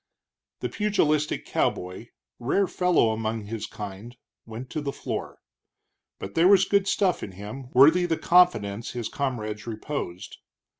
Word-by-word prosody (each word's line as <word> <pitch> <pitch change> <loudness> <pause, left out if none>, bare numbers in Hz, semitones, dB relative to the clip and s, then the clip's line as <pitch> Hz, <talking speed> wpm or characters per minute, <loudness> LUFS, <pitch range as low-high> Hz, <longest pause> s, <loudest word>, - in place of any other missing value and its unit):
The - - -2
pugilistic 155 -8 0
cowboy, 90 +6 -2 0.3
rare 140 +11 +1
fellow 180 -11 +2
among 110 0 -2
his 110 +1 -5
kind, 105 +4 -8 0.3
went 115 +3 -8
to 155 - -3
the 140 -1 -3
floor. - - -5 0.8
But 95 - -7
there 170 +2 +4
was 195 -1 +6
good 200 -1 +2
stuff 190 -4 +1
in 95 - -7
him, 105 +7 -8
worthy 160 +8 +6
the 165 -2 0
confidence 115 - +3
his 120 -3 -4
comrades 110 -6 -3
reposed. 110 -5 -5
125 Hz, 140 wpm, -26 LUFS, 110-165 Hz, 0.8 s, was